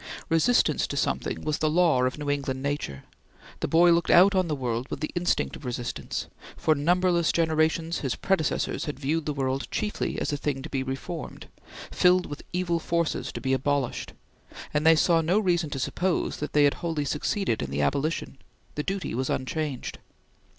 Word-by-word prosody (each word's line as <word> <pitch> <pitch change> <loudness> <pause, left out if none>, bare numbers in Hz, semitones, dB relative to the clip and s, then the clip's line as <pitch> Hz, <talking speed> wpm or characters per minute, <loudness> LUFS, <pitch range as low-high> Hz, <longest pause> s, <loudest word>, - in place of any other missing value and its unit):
Resistance 165 +10 +3
to - - -4
something - - -1
was 155 -1 -1
the 155 - +2
law 160 -5 +3
of 130 - -1
New 150 -1 -5
England 135 -2 -2
nature; 140 - -3 0.6
the - - -1
boy 170 +1 +5
looked 170 -1 +2
out 190 +3 +7
on 185 -2 +2
the 155 - -1
world 125 -1 -3
with - - -4
the 155 - -3
instinct 175 0 0
of - - -12
resistance; 120 -1 -4 0.3
for 155 - +3
numberless 170 +3 +2
generations 160 0 +1
his 135 -4 -2
predecessors 190 -6 0
had 145 -3 -5
viewed 150 +3 -1
the 150 - 0
world 135 -1 -1
chiefly 210 -1 -2
as 145 - -1
a - - 0
thing 140 -2 -2
to - - -8
be 135 - -1
reformed, 135 +6 -5 0.5
filled 180 0 +4
with 145 - -7
evil 175 -1 0
forces 170 0 -1
to - - -6
be 135 -1 0
abolished, 135 -1 -1 0.6
and 150 +2 +2
they 165 - +8
saw 165 +1 +3
no 170 +5 +2
reason 175 -6 +1
to 145 - -4
suppose 175 +7 -1
that 150 - -5
they 150 - +5
had 145 - +4
wholly 160 -4 -1
succeeded 150 - -1
in 70 - -3
the 70 +1 -1
abolition; 140 - -1 0.3
the 150 - -2
duty 195 +4 -3
was 130 +3 -1
unchanged. 140 0 -3
155 Hz, 185 wpm, -26 LUFS, 135-170 Hz, 0.6 s, they